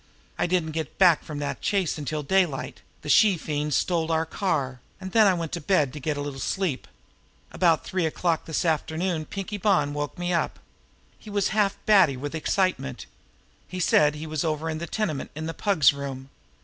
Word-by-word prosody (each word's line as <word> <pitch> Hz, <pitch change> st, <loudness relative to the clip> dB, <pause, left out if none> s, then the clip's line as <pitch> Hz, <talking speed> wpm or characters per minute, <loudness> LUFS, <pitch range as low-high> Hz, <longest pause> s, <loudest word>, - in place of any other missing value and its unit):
I -, -, +2 dB
didn't 175 Hz, -3 st, 0 dB
get 160 Hz, -2 st, -5 dB
back 175 Hz, -5 st, +5 dB
from 150 Hz, -, -7 dB
that 145 Hz, -1 st, -4 dB
chase 195 Hz, -5 st, 0 dB
until 150 Hz, +1 st, -3 dB
daylight 175 Hz, -3 st, 0 dB, 0.2 s
the -, -, -8 dB
she 195 Hz, +4 st, +5 dB
fiend 150 Hz, -2 st, -2 dB
stole 165 Hz, -2 st, 0 dB
our 160 Hz, 0 st, +1 dB
car 145 Hz, -9 st, -2 dB, 0.2 s
and 190 Hz, -, -7 dB
then 220 Hz, 0 st, +6 dB
I 190 Hz, -, +4 dB
went 165 Hz, -2 st, -4 dB
to -, -, -4 dB
bed 150 Hz, -5 st, +2 dB
to 150 Hz, -, -6 dB
get 150 Hz, +1 st, -2 dB
a -, -, -3 dB
little 145 Hz, -2 st, -5 dB
sleep. 180 Hz, -3 st, -2 dB, 0.6 s
About 165 Hz, -4 st, +2 dB
three 185 Hz, -3 st, 0 dB
o'clock 165 Hz, 0 st, -1 dB
this 160 Hz, +2 st, -2 dB
afternoon 160 Hz, +1 st, -1 dB
Pinkie 200 Hz, +4 st, -5 dB
Bonn 175 Hz, -8 st, +2 dB
woke 145 Hz, 0 st, -4 dB
me 175 Hz, 0 st, -1 dB
up. 170 Hz, -, 0 dB, 0.6 s
He 215 Hz, -, -12 dB
was 205 Hz, -1 st, 0 dB
half 210 Hz, -2 st, +1 dB
batty 190 Hz, -11 st, +5 dB
with 145 Hz, +3 st, -5 dB
excitement. 160 Hz, -, -1 dB, 0.6 s
He 185 Hz, -, -6 dB
said 150 Hz, -3 st, +4 dB
he 150 Hz, +1 st, -6 dB
was 155 Hz, -2 st, -2 dB
over 160 Hz, 0 st, -1 dB
in 155 Hz, -, -4 dB
the 170 Hz, -, -5 dB
tenement 170 Hz, -11 st, -2 dB
in 155 Hz, +1 st, -5 dB
the 165 Hz, -, -3 dB
Pug's 165 Hz, -11 st, +3 dB
room. 135 Hz, -1 st, -7 dB
160 Hz, 195 wpm, -25 LUFS, 145-185 Hz, 0.6 s, then